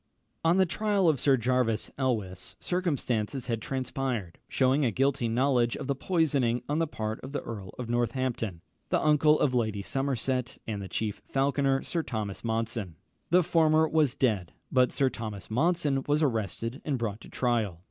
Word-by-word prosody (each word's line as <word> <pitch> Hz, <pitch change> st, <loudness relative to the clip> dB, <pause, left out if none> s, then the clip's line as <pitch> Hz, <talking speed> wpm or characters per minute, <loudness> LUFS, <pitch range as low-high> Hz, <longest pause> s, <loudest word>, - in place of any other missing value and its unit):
On 165 Hz, +3 st, +4 dB
the 190 Hz, -, +5 dB
trial 200 Hz, +1 st, +1 dB
of 155 Hz, -5 st, +3 dB
Sir 135 Hz, +1 st, +4 dB
Jervis 120 Hz, -2 st, 0 dB
Elwes, 110 Hz, -9 st, -2 dB
circumstances 135 Hz, -, -1 dB
had 115 Hz, -3 st, -2 dB
transpired, 130 Hz, -7 st, -3 dB
shewing 135 Hz, +2 st, +2 dB
a 125 Hz, -, +3 dB
guilty 130 Hz, +2 st, +1 dB
knowledge 120 Hz, 0 st, +2 dB
of -, -, -5 dB
the 140 Hz, -, 0 dB
poisoning 135 Hz, -7 st, +1 dB
on 150 Hz, +2 st, 0 dB
the 165 Hz, -, +1 dB
part 110 Hz, -5 st, -4 dB
of 135 Hz, -, -9 dB
the 145 Hz, -, -1 dB
Earl 100 Hz, -5 st, -7 dB
of 125 Hz, -, -5 dB
Northampton, 120 Hz, -5 st, -1 dB, 0.3 s
the -, -, +2 dB
uncle 150 Hz, 0 st, +5 dB
of 135 Hz, -, +2 dB
Lady 110 Hz, -5 st, 0 dB
Somerset, 130 Hz, 0 st, -1 dB
and 105 Hz, -3 st, -3 dB
the 95 Hz, -, -7 dB
chief 105 Hz, +3 st, -3 dB
falconer 135 Hz, 0 st, +1 dB
Sir 170 Hz, -, -1 dB
Thomas 110 Hz, -9 st, -4 dB
Monson. 115 Hz, -5 st, -2 dB, 0.3 s
The 180 Hz, +2 st, +5 dB
former 160 Hz, -1 st, +4 dB
was 155 Hz, -5 st, +2 dB
dead; 105 Hz, -9 st, 0 dB, 0.2 s
but 125 Hz, -1 st, +4 dB
Sir 135 Hz, -2 st, +1 dB
Thomas 110 Hz, -3 st, -6 dB
Monson 145 Hz, +1 st, +2 dB
was 150 Hz, +2 st, +2 dB
arrested 115 Hz, -, -2 dB
and 145 Hz, -4 st, -1 dB
brought 110 Hz, -2 st, -3 dB
to -, -, -12 dB
trial. 115 Hz, -8 st, 0 dB
130 Hz, 170 wpm, -28 LUFS, 115-145 Hz, 0.3 s, the